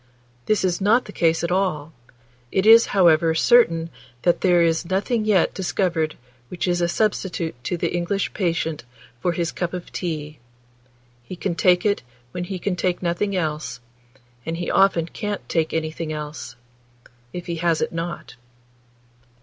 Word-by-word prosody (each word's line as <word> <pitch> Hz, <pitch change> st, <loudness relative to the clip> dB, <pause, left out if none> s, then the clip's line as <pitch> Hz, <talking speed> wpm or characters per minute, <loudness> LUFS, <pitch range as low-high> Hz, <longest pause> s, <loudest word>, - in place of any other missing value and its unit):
This 215 Hz, -2 st, +2 dB
is 180 Hz, +1 st, 0 dB
not 220 Hz, +6 st, +3 dB
the -, -, -9 dB
case 165 Hz, 0 st, +1 dB
at 170 Hz, -, -1 dB
all; 165 Hz, -5 st, -1 dB, 0.6 s
it 190 Hz, -, +1 dB
is, 225 Hz, +1 st, +8 dB
however, 165 Hz, -4 st, +4 dB
certain 165 Hz, -5 st, +4 dB, 0.3 s
that 175 Hz, -, +2 dB
there 175 Hz, -2 st, +4 dB
is 165 Hz, 0 st, 0 dB
nothing 215 Hz, +4 st, 0 dB
yet 205 Hz, -5 st, +3 dB
discovered 175 Hz, -4 st, -1 dB, 0.3 s
which 180 Hz, -, -3 dB
is 175 Hz, 0 st, +1 dB
a 170 Hz, -, +2 dB
substitute 190 Hz, -4 st, -1 dB
to 175 Hz, -, -1 dB
the -, -, -2 dB
English 175 Hz, +3 st, -1 dB
patient 165 Hz, -, -1 dB, 0.4 s
for 175 Hz, +7 st, 0 dB
his 170 Hz, 0 st, -1 dB
cup 175 Hz, -1 st, -3 dB
of 180 Hz, -, -8 dB
tea; 155 Hz, -4 st, -4 dB, 0.8 s
he 120 Hz, +10 st, -9 dB
can 180 Hz, +1 st, -2 dB
take 180 Hz, +2 st, +3 dB
it 205 Hz, -1 st, +2 dB, 0.3 s
when 180 Hz, +4 st, -4 dB
he 190 Hz, +1 st, -4 dB
can 180 Hz, +1 st, -2 dB
take 180 Hz, 0 st, -1 dB
nothing 180 Hz, +4 st, -1 dB
else, 150 Hz, -7 st, -2 dB, 0.6 s
and 165 Hz, +4 st, -4 dB
he 175 Hz, -, -3 dB
often 195 Hz, -4 st, +3 dB
can't 205 Hz, +3 st, -5 dB
take 160 Hz, -2 st, 0 dB
anything 160 Hz, 0 st, -3 dB
else, 150 Hz, -5 st, -6 dB, 0.8 s
if 175 Hz, -1 st, -6 dB
he 170 Hz, -1 st, -4 dB
has 165 Hz, -1 st, +1 dB
it -, -, -1 dB
not. 165 Hz, -3 st, -5 dB
175 Hz, 160 wpm, -22 LUFS, 165-190 Hz, 0.8 s, is